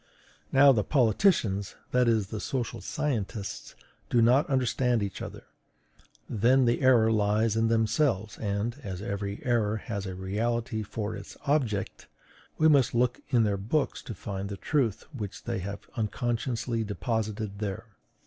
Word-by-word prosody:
Now, 140 +1 +7
the 110 -5 +2
politicians, 110 - +2 0.2
that 125 -1 +3
is, 110 -4 +2
the 110 - -4
social 130 -1 -3
scientists, 115 -8 -3 0.3
do 120 - +3
not 125 +6 +4
understand 125 -3 +1
each 100 -1 -5
other; - - -7 0.8
then 125 +4 +3
the 120 +3 +1
error 120 -4 +5
lies 105 +1 +2
in 115 0 +2
themselves; 110 -1 +1
and, 105 +2 -2
as 95 -3 -5
every 100 0 -4
error 110 -3 +1
has 100 -2 -5
a 95 - -5
reality 110 +4 -2
for 105 +1 -4
its 100 - -10
object, 125 -9 -1 0.5
we 155 - +5
must 140 -7 +4
look 125 +1 +1
in 120 -5 +4
their 100 -2 +1
books 120 +10 -1
to 115 - -7
find 100 +1 -5
the 100 - -5
truth 120 -4 0
which 105 -7 -6
they - - -2
have 100 +2 -5
unconsciously 115 0 -1
deposited 110 -1 -3
there." 100 0 -4
110 Hz, 150 wpm, -28 LUFS, 100-125 Hz, 0.8 s, Now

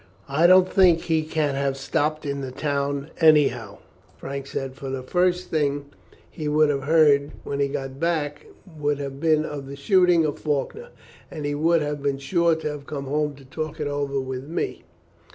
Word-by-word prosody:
"I 155 +5 +4
don't 185 0 +7
think 180 -4 +4
he 160 -2 +1
can 155 -2 -1
have 135 0 -1
stopped 155 +3 -1
in 140 -1 -3
the 135 - -4
town 140 +1 -2
anyhow," 135 -10 +3 0.4
Frank 140 0 -6
said; 135 -1 -4
"for 135 0 -7
the 130 -1 -4
first 180 +5 0
thing 145 -2 -1 0.4
he 155 - -6
would 150 0 +3
have 135 -1 -3
heard 145 -2 +4
when 140 - -4
he 140 - +2
got 135 0 -5
back 155 -3 -2 0.3
would 145 -1 0
have 140 -1 -6
been 155 -1 +2
of 145 -3 -6
the 140 - -7
shooting 175 +3 +3
of 145 - -3
Faulkner, 155 - -2 0.4
and 150 - -6
he 145 - -1
would 160 +2 +2
have 145 -1 -3
been 140 -1 0
sure 170 +4 +2
to 160 - -4
have 150 -2 -6
come 140 -2 -5
home 150 +1 -1
to 135 0 -16
talk 155 +3 -5
it 150 - -2
over 145 -1 -2
with 130 0 -5
me. 170 - -4
145 Hz, 190 wpm, -24 LUFS, 140-160 Hz, 0.4 s, don't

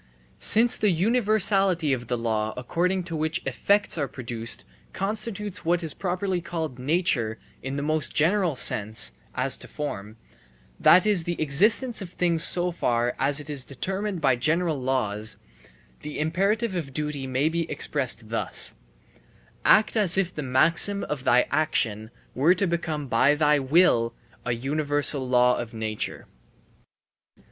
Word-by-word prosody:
Since 235 +3 +5
the 210 - +2
universality 195 - +1
of 125 -1 -4
the 120 - -1
law 110 -2 -2
according 180 +9 -1
to 170 -2 -6
which 160 +2 -2
effects 205 -4 +1
are 140 - -1
produced 115 -3 -4 0.3
constitutes 210 0 -2
what 175 +1 0
is 160 - 0
properly 185 0 -2
called 160 -7 -5
nature 130 -6 0 0.2
in 135 +1 -5
the 140 - -3
most 155 0 -2
general 175 0 +2
sense 105 - +2 0.2
(as - - 0
to - - -11
form), 110 -7 -6 0.6
that 180 +3 +6
is 200 -6 +2
the 175 0 -3
existence 210 - +3
of 185 - -6
things 170 -2 0
so 180 +1 +3
far 120 -7 0
as 140 +2 +2
it 150 - -8
is 145 -4 -1
determined 190 +7 -4
by 135 -3 +3
general 155 +4 0
laws, 110 -5 -1 0.6
the 150 0 -6
imperative 195 +8 0
of 140 -7 -5
duty 150 -3 -3
may 130 +3 0
be 165 0 -2
expressed 125 -6 -2
thus: 115 - -1 0.9
Act 215 +2 +4
as 195 -5 +2
if 185 -2 0
the 150 - -5
maxim 165 +9 +2
of 145 -3 -4
thy 125 -1 +4
action 110 -8 0 0.2
were 155 +8 +3
to 195 - +1
become 165 -4 -3
by 130 +4 +3
thy 150 -1 +3
will 130 -5 +2 0.3
a 125 - 0
universal 145 +1 0
law 125 0 +3
of 120 -1 -7
nature. 110 -1 -4
155 Hz, 150 wpm, -25 LUFS, 130-180 Hz, 0.9 s, that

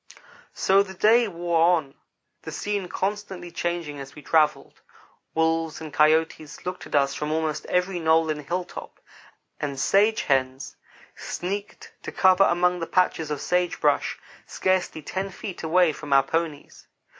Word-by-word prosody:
So 195 +1 +4
the 190 -1 -5
day 225 +5 +4
wore 170 -3 -1 0.2
on, 140 -4 -7 0.5
the - - -8
scene 205 -2 -3
constantly 190 -2 -4
changing 170 -5 -3
as 135 0 -9
we 150 - -12
travelled. 155 -2 +1 0.5
Wolves 160 0 0
and 155 -2 -8
coyotes 155 0 +1
looked 180 0 -5
at - - -4
us 140 -1 +3
from 150 +2 -3
almost 155 -1 -2
every 180 0 0
knoll 160 -1 +3
and 150 -1 -4
hilltop; 175 +4 -6 0.6
and 140 -2 -4
sage 210 +8 +3
hens 135 +1 -1 0.4
sneaked 200 +3 -6
to - - -6
cover 190 +1 +5
among 180 0 +2
the 165 - -4
patches 165 -4 +1
of 150 -2 -3
sage 180 -1 0
brush, - - +1 0.3
scarcely 185 -4 -1
ten 190 +5 -3
feet 190 0 -7
away 165 0 +3
from 145 -2 -4
our 135 0 +6
ponies. 160 0 -4
165 Hz, 150 wpm, -25 LUFS, 150-185 Hz, 0.6 s, our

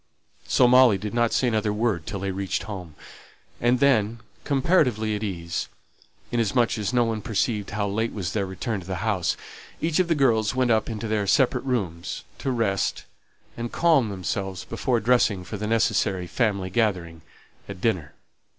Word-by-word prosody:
So 125 - +4
Molly 125 -4 +6
did 105 +2 -5
not 120 -1 +2
say 130 - +2
another 110 -2 +1
word 105 -6 -1
till 100 - -4
they 100 0 -1
reached 95 0 -2
home; 90 -7 -7 0.7
and 120 +1 +3
then, 115 -5 +2 0.2
comparatively 130 - +2
at 105 - -4
ease, 85 -5 -3 0.6
inasmuch 120 0 +1
as 105 0 -1
no 125 -1 +3
one 110 -2 -2
perceived 105 -1 -1
how 105 0 -1
late 110 +3 -1
was 95 -4 -4
their 100 -3 -1
return 105 +3 -3
to 90 - -13
the 95 +2 -3
house, 95 -7 0 0.4
each 160 +1 0
of 185 - +3
the 165 - +2
girls 115 -5 +2
went 130 -2 +2
up 110 +1 +2
into 110 0 -4
their 105 -2 0
separate 130 +2 +2
rooms, 95 -11 -3 0.2
to - - -2
rest 110 -6 0 0.5
and 120 0 -5
calm 155 -9 +3
themselves 95 -1 -4
before 120 +1 0
dressing 115 -5 +2
for 105 +3 -6
the 105 +1 -3
necessary 105 -4 +1
family 100 -2 -1
gathering 90 -7 -1 0.5
at 100 -2 -7
dinner. 90 -9 -1
110 Hz, 170 wpm, -25 LUFS, 95-120 Hz, 0.7 s, Molly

